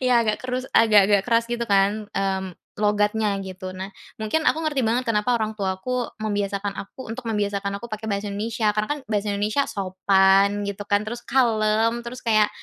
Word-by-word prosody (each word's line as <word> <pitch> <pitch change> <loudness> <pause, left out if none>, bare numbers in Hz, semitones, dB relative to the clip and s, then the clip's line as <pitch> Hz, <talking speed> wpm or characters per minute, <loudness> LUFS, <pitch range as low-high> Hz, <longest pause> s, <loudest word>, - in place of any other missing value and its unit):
ya 255 -1 +2
agak 215 -1 0
keras, 255 0 -3
agak-agak 205 -3 +5
keras, 230 0 +3
gitu 235 0 -3
kan, 200 +1 +2
mmm, 190 -2 -1 0.2
logatnya 210 0 +1
gitu. 185 0 -7
Nah, 190 +1 -6 0.2
mungkin 220 +9 0
aku 320 +1 0
ngerti 295 -3 0
banget 240 +2 +1
kenapa 230 +2 +1
orang 220 -1 -2
tuaku 215 +5 -2
membiasakan 205 -2 -2
aku, 255 +6 -10
untuk 235 -1 -6
membiasakan 200 -2 -1
aku 235 - -9
pakai 220 +1 -5
bahasa 200 0 -2
Indonesia, 215 +1 0
karena 210 0 -1
kan - - -8
bahasa 205 0 0
Indonesia 210 +7 0
sopan, 195 +1 +3
gitu 200 0 -5
kan, 205 +1 +2
terus 235 +2 -5
kalem, 230 -2 +2
terus 240 +2 -9
kayak 215 -2 +4
210 Hz, 175 wpm, -23 LUFS, 200-230 Hz, 0.2 s, agak-agak